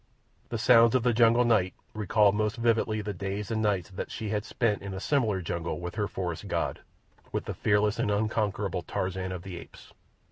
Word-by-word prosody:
The 115 Hz, -, -2 dB
sounds 115 Hz, 0 st, +6 dB
of 125 Hz, -, +2 dB
the 125 Hz, -1 st, +3 dB
jungle 120 Hz, +1 st, +5 dB
night 105 Hz, -6 st, +2 dB, 0.2 s
recalled 105 Hz, -1 st, +3 dB
most 105 Hz, +1 st, 0 dB
vividly 115 Hz, -2 st, +1 dB
the 105 Hz, 0 st, -4 dB
days 100 Hz, +2 st, -4 dB
and 110 Hz, -1 st, 0 dB
nights 100 Hz, -4 st, 0 dB
that 95 Hz, -, -5 dB
she 110 Hz, -, -5 dB
had 105 Hz, -1 st, -1 dB
spent 110 Hz, -2 st, 0 dB
in 100 Hz, -1 st, -6 dB
a -, -, -4 dB
similar 110 Hz, -6 st, +1 dB
jungle 85 Hz, +1 st, -3 dB
with 90 Hz, 0 st, -5 dB
her 105 Hz, -1 st, -1 dB
forest 90 Hz, -4 st, -4 dB
god—with -, -, -5 dB
the -, -, -4 dB
fearless 105 Hz, 0 st, +1 dB
and -, -, +1 dB
unconquerable 105 Hz, -3 st, 0 dB
Tarzan 95 Hz, +1 st, -3 dB
of 90 Hz, -2 st, -6 dB
the 95 Hz, -3 st, -7 dB
Apes. -, -, -14 dB
105 Hz, 190 wpm, -28 LUFS, 95-110 Hz, 0.2 s, sounds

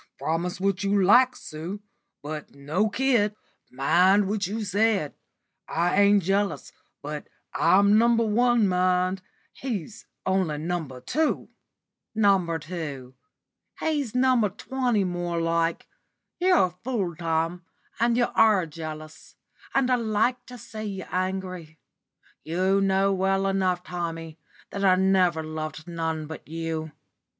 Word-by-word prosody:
"Promise 170 Hz, +3 st, -2 dB
what 195 Hz, +1 st, 0 dB
you 200 Hz, 0 st, +2 dB
like, 250 Hz, +6 st, +5 dB
Sue, 165 Hz, +6 st, -7 dB, 0.4 s
but 150 Hz, -1 st, -7 dB
no 155 Hz, +10 st, 0 dB
kid. 225 Hz, -3 st, +1 dB, 0.3 s
Mind 180 Hz, +9 st, +3 dB
what 205 Hz, -1 st, -1 dB
you 215 Hz, +2 st, -3 dB
said. 205 Hz, -6 st, +1 dB, 0.5 s
I 175 Hz, +4 st, +1 dB
ain't 200 Hz, -1 st, +5 dB
jealous, 200 Hz, +3 st, -1 dB, 0.3 s
but -, -, -6 dB, 0.3 s
I'm 200 Hz, +2 st, +4 dB
No. 235 Hz, -, +4 dB
1, 230 Hz, 0 st, +3 dB
mind. 185 Hz, 0 st, +1 dB, 0.3 s
He's 220 Hz, -, -6 dB, 0.2 s
only 190 Hz, -5 st, +1 dB
No. 175 Hz, +4 st, -2 dB, 0.2 s
2." 310 Hz, -, -1 dB, 0.7 s
"No. 195 Hz, -6 st, +3 dB
2! 150 Hz, -6 st, -6 dB, 0.7 s
He's 290 Hz, -7 st, -1 dB
No. 255 Hz, -1 st, +4 dB
20 240 Hz, +1 st, -1 dB
more 175 Hz, -2 st, -2 dB
like. 165 Hz, 0 st, 0 dB, 0.5 s
You're 360 Hz, -, +4 dB
a -, -, -3 dB
fool, 205 Hz, -10 st, -2 dB
Tom, 165 Hz, +2 st, -1 dB, 0.4 s
and 235 Hz, 0 st, +2 dB
you 245 Hz, -, +4 dB
are 210 Hz, -5 st, +4 dB
jealous. 155 Hz, 0 st, -9 dB, 0.4 s
And 265 Hz, -2 st, +2 dB
I 250 Hz, -, +4 dB
like 230 Hz, +2 st, 0 dB
to 250 Hz, -, -9 dB
see 215 Hz, -1 st, -8 dB
you 195 Hz, -3 st, -5 dB
angry. 185 Hz, -3 st, -3 dB, 0.7 s
You 185 Hz, +4 st, +1 dB
know 195 Hz, 0 st, +2 dB
well 195 Hz, +1 st, +1 dB
enough, 185 Hz, -2 st, 0 dB
Tommy, 165 Hz, -3 st, -5 dB, 0.3 s
that 200 Hz, -, -4 dB
I 185 Hz, -1 st, +5 dB
never 185 Hz, -3 st, +2 dB
loved 155 Hz, +1 st, -6 dB
none 160 Hz, -2 st, -3 dB
but 160 Hz, 0 st, -9 dB
you. 160 Hz, 0 st, -4 dB
190 Hz, 125 wpm, -26 LUFS, 165-210 Hz, 0.7 s, like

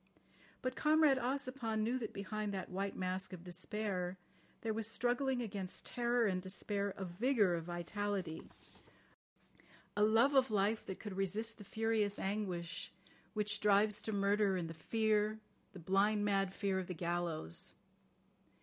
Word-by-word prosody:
But 255 Hz, 0 st, -1 dB
Comrade 305 Hz, -3 st, +5 dB
Ossipon 255 Hz, -3 st, -1 dB
knew 245 Hz, +4 st, +1 dB
that 220 Hz, -, -4 dB
behind 210 Hz, +1 st, -3 dB
that 190 Hz, -1 st, -4 dB
white 195 Hz, +2 st, -2 dB
mask 185 Hz, +1 st, -2 dB
of 175 Hz, -2 st, -8 dB
despair 185 Hz, 0 st, -3 dB, 0.4 s
there 225 Hz, -1 st, -1 dB
was 225 Hz, 0 st, 0 dB
struggling 245 Hz, +3 st, +1 dB
against 195 Hz, -4 st, -4 dB
terror 240 Hz, -1 st, +2 dB
and 185 Hz, -3 st, +1 dB
despair 200 Hz, +1 st, -2 dB
a 195 Hz, -, -3 dB
vigour 205 Hz, +1 st, +2 dB
of 165 Hz, -1 st, -2 dB
vitality, 175 Hz, 0 st, -3 dB, 1.5 s
a 205 Hz, -, +1 dB
love 225 Hz, +6 st, +5 dB
of 265 Hz, -2 st, +5 dB
life 210 Hz, +1 st, +2 dB
that 190 Hz, -, -5 dB
could 205 Hz, -3 st, -6 dB
resist 210 Hz, +5 st, -1 dB
the -, -, -8 dB
furious 215 Hz, 0 st, 0 dB
anguish 190 Hz, -4 st, -3 dB, 0.4 s
which 210 Hz, 0 st, 0 dB
drives 210 Hz, 0 st, +4 dB
to 220 Hz, -, -3 dB
murder 200 Hz, -1 st, +3 dB
and 165 Hz, -2 st, -3 dB
the -, -, -6 dB
fear, 215 Hz, +4 st, +1 dB, 0.3 s
the -, -, -11 dB
blind, 200 Hz, +4 st, +2 dB
mad 195 Hz, -2 st, +2 dB
fear 195 Hz, -2 st, 0 dB
of 185 Hz, -, -4 dB
the 180 Hz, -, -4 dB
gallows. 170 Hz, -, -2 dB
205 Hz, 150 wpm, -36 LUFS, 185-225 Hz, 1.5 s, Comrade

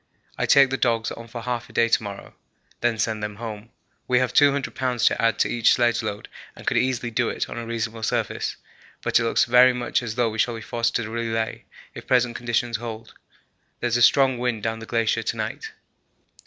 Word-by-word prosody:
I -, -, -1 dB
take 135 Hz, -1 st, +6 dB
the 135 Hz, -, 0 dB
dogs 115 Hz, -3 st, 0 dB
on 115 Hz, -, -8 dB
for 115 Hz, 0 st, -8 dB
half 120 Hz, -1 st, -3 dB
a -, -, -16 dB
day 115 Hz, -, +3 dB
to 115 Hz, -, +2 dB
morrow, 100 Hz, -2 st, -8 dB, 0.5 s
then 120 Hz, -1 st, 0 dB
send 110 Hz, 0 st, -1 dB
them 105 Hz, 0 st, -4 dB
home. 110 Hz, 0 st, -7 dB, 0.4 s
We 125 Hz, -, +3 dB
have 130 Hz, 0 st, +1 dB
200 140 Hz, -1 st, +3 dB
lbs. 125 Hz, -2 st, -1 dB
to -, -, +3 dB
add 115 Hz, -1 st, +2 dB
to -, -, +2 dB
each 120 Hz, -1 st, +3 dB
sledge 120 Hz, -1 st, +2 dB
load 105 Hz, -2 st, -5 dB, 0.3 s
and -, -, -13 dB
could -, -, +1 dB
easily 125 Hz, -2 st, 0 dB
do 120 Hz, +1 st, 0 dB
it -, -, -3 dB
on -, -, -6 dB
a 115 Hz, -, -6 dB
reasonable 115 Hz, -1 st, -3 dB
surface, -, -, -2 dB, 0.5 s
but -, -, +3 dB
it -, -, 0 dB
looks 115 Hz, -, +2 dB
very 125 Hz, +1 st, +6 dB
much 125 Hz, 0 st, -1 dB
as 110 Hz, -3 st, -5 dB
though 120 Hz, -2 st, +1 dB
we 110 Hz, -, -6 dB
shall 120 Hz, +1 st, +1 dB
be 115 Hz, -, -7 dB
forced 115 Hz, 0 st, -1 dB
to 120 Hz, -3 st, -1 dB
relay 115 Hz, -1 st, -3 dB, 0.3 s
if -, -, -10 dB
present 125 Hz, -2 st, +2 dB
conditions 120 Hz, 0 st, -1 dB
hold. 115 Hz, -1 st, -8 dB, 0.7 s
There 120 Hz, -, -1 dB
is 120 Hz, -, 0 dB
a -, -, -1 dB
strong 130 Hz, +1 st, +4 dB
wind 120 Hz, -4 st, -2 dB
down 115 Hz, 0 st, -2 dB
the 115 Hz, -, -9 dB
glacier 115 Hz, -1 st, +1 dB
to -, -, -3 dB
night. -, -, -4 dB
115 Hz, 220 wpm, -24 LUFS, 115-125 Hz, 0.7 s, take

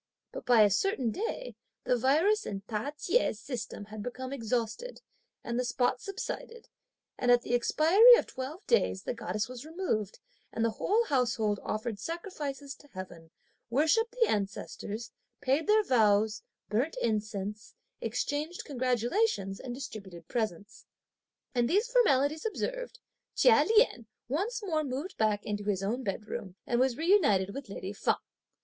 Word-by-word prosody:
But -, -, -8 dB
by 235 Hz, -3 st, +7 dB
a 205 Hz, -, +4 dB
certain 250 Hz, -, +1 dB
day 455 Hz, -, -4 dB, 0.3 s
the 250 Hz, -, +2 dB
virus 315 Hz, -, +3 dB
in 195 Hz, -1 st, -4 dB
Ta 215 Hz, +5 st, -3 dB
Chieh's 350 Hz, -, +1 dB
system 235 Hz, -4 st, -6 dB
had 215 Hz, +1 st, -8 dB
become 255 Hz, +3 st, -5 dB
exhausted, 235 Hz, -, -2 dB, 0.4 s
and 235 Hz, +1 st, -2 dB
the -, -, +1 dB
spots 245 Hz, +1 st, 0 dB
subsided, 450 Hz, +3 st, -6 dB, 0.5 s
and 245 Hz, -, +1 dB
at 245 Hz, 0 st, +6 dB
the -, -, -3 dB
expiry 345 Hz, -, +7 dB
of -, -, 0 dB
twelve 275 Hz, +9 st, -7 dB
days 200 Hz, -, +2 dB
the -, -, -2 dB
goddess 215 Hz, -2 st, -3 dB
was 250 Hz, 0 st, -8 dB
removed, 310 Hz, -, -2 dB, 0.3 s
and 230 Hz, -, 0 dB
the 230 Hz, -, +1 dB
whole 425 Hz, -, +1 dB
household 235 Hz, -, +1 dB
offered 215 Hz, -1 st, -3 dB
sacrifices 295 Hz, -, -5 dB
to 290 Hz, -, -18 dB
heaven, 180 Hz, -, -9 dB, 0.4 s
worshipped 320 Hz, -, +2 dB
the 460 Hz, -, +5 dB
ancestors, 210 Hz, +2 st, -3 dB, 0.3 s
paid 275 Hz, +7 st, +1 dB
their 430 Hz, 0 st, +5 dB
vows, 215 Hz, -, +3 dB, 0.3 s
burnt 240 Hz, +10 st, 0 dB
incense, 210 Hz, -2 st, -3 dB, 0.3 s
exchanged 290 Hz, +9 st, -2 dB
congratulations, 250 Hz, -, 0 dB
and 245 Hz, -2 st, -6 dB
distributed 190 Hz, -, -8 dB
presents. 215 Hz, -3 st, -4 dB, 0.7 s
And 240 Hz, -2 st, +2 dB
these 415 Hz, +7 st, +3 dB
formalities 310 Hz, -, +3 dB
observed, -, -, -3 dB, 0.4 s
Chia 480 Hz, -2 st, +6 dB
Lien 430 Hz, -, +3 dB, 0.2 s
once 415 Hz, -, -2 dB
more 315 Hz, -6 st, 0 dB
moved 285 Hz, +7 st, -4 dB
back 215 Hz, -2 st, +1 dB
into 205 Hz, -1 st, -3 dB
his 195 Hz, -2 st, 0 dB
own 230 Hz, +6 st, -1 dB
bedroom 200 Hz, -3 st, -5 dB
and 240 Hz, -, +1 dB
was 255 Hz, -1 st, +2 dB
reunited 255 Hz, -, +3 dB
with 275 Hz, -5 st, -7 dB
lady 195 Hz, 0 st, -5 dB
Feng. -, -, +1 dB
245 Hz, 145 wpm, -30 LUFS, 215-325 Hz, 0.7 s, by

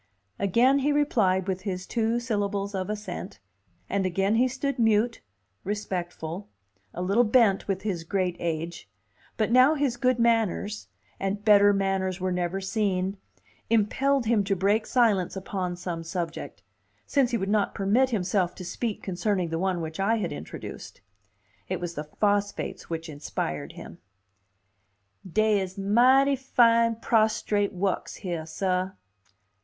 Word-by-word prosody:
Again 245 Hz, +8 st, +3 dB
he 285 Hz, +2 st, +1 dB
replied 205 Hz, -11 st, +2 dB
with 190 Hz, -1 st, -2 dB
his 185 Hz, -2 st, -4 dB
two 230 Hz, 0 st, 0 dB
syllables 205 Hz, -3 st, -2 dB
of 190 Hz, 0 st, -3 dB
assent, 210 Hz, 0 st, -5 dB, 0.5 s
and 200 Hz, -1 st, 0 dB
again 195 Hz, +3 st, +1 dB
he 245 Hz, +3 st, +4 dB
stood 265 Hz, +1 st, -3 dB
mute, 225 Hz, +1 st, +2 dB, 0.4 s
respectful, 185 Hz, -3 st, -4 dB, 0.4 s
a 180 Hz, -, -4 dB
little 200 Hz, +6 st, +3 dB
bent 215 Hz, -4 st, +3 dB
with 195 Hz, -1 st, -2 dB
his 185 Hz, -6 st, -2 dB
great 180 Hz, 0 st, -1 dB
age; 165 Hz, -, -4 dB, 0.5 s
but 220 Hz, 0 st, 0 dB
now 255 Hz, +5 st, +6 dB
his 275 Hz, -5 st, 0 dB
good 255 Hz, -1 st, +2 dB
manners 225 Hz, -3 st, +1 dB, 0.3 s
and 200 Hz, +2 st, -3 dB
better 205 Hz, -1 st, +7 dB
manners 195 Hz, -1 st, 0 dB
were 185 Hz, 0 st, -1 dB
never 180 Hz, +1 st, -1 dB
seen 195 Hz, -1 st, -1 dB, 0.5 s
impelled 245 Hz, +5 st, +2 dB
him 220 Hz, -2 st, +2 dB
to 195 Hz, 0 st, +1 dB
break 205 Hz, +4 st, +1 dB
silence 210 Hz, -9 st, +2 dB
upon 190 Hz, -2 st, -3 dB
some 175 Hz, -2 st, -5 dB
subject, 165 Hz, -1 st, -5 dB, 0.4 s
since 275 Hz, -4 st, +2 dB
he 240 Hz, -, 0 dB
would 195 Hz, -, -3 dB
not 205 Hz, 0 st, +1 dB
permit 215 Hz, +7 st, +2 dB
himself 185 Hz, -4 st, 0 dB
to 185 Hz, -, -8 dB
speak 220 Hz, +4 st, -4 dB
concerning 185 Hz, -1 st, -1 dB
the 165 Hz, 0 st, -2 dB
one 185 Hz, -2 st, 0 dB
which 160 Hz, +1 st, -6 dB
I 200 Hz, +4 st, +2 dB
had 220 Hz, -, -2 dB
introduced. 75 Hz, +5 st, -8 dB, 0.7 s
It 185 Hz, -, -2 dB
was 175 Hz, -1 st, -4 dB
the 150 Hz, -1 st, -5 dB
phosphates 205 Hz, +5 st, -1 dB
which 165 Hz, 0 st, -4 dB
inspired 145 Hz, -, -4 dB
him. -, -, -11 dB, 1.3 s
"Dey 215 Hz, +1 st, +3 dB
is 190 Hz, 0 st, -6 dB
mighty 255 Hz, +8 st, +4 dB
fine 230 Hz, -3 st, +3 dB
prostrate 215 Hz, -2 st, +1 dB
wukks 190 Hz, +1 st, -2 dB
heah, 170 Hz, -5 st, -5 dB
sah." 185 Hz, +2 st, -1 dB
200 Hz, 145 wpm, -26 LUFS, 185-230 Hz, 1.3 s, better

